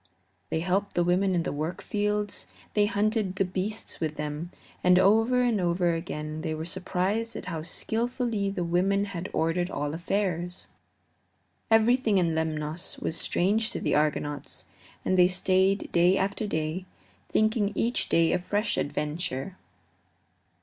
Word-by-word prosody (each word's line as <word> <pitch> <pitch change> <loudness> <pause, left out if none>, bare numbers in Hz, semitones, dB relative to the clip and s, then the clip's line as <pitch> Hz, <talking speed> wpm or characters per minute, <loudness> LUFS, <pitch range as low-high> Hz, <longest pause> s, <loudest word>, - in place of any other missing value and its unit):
They 160 - -1
helped 190 +4 0
the 175 - +3
women 185 +2 +2
in 170 - +1
the - - -2
work 155 +4 -2
of - - -13
the - - -25
fields; 210 0 -1 0.3
they 205 -1 +3
hunted 210 -2 0
the 195 - +1
beasts 195 +4 -3
with 155 -1 -2
them, 150 +3 -4 0.3
and 180 0 +6
over 225 +6 +4
and 230 -5 +2
over 175 0 +2
again 155 -2 -4
they 160 -1 -2
were 160 +1 -5
surprised 190 +5 -1
at - - -6
how 165 -4 -4
skillfully 225 - -1
the 190 -2 -2
women 190 +4 +2
had 190 -3 -5
ordered 170 +2 0
all 145 -2 -3
affairs. 175 0 -2 1.0
Everything 225 -1 +4
in 170 -3 +2
Lemnos 160 0 -2
was - - -3
strange 215 +5 +2
to - - -5
the - - 0
Argonauts, 145 -1 -1 0.4
and 185 - +2
they 180 - +8
stayed 190 +1 +2
day 175 +2 +4
after 200 +2 -1
day, 160 +2 -2 0.4
thinking 215 -1 +2
each 235 +4 0
day 165 -1 +4
a 180 - +2
fresh 205 +4 -1
adventure. 150 +2 -3
185 Hz, 155 wpm, -27 LUFS, 165-205 Hz, 1.0 s, they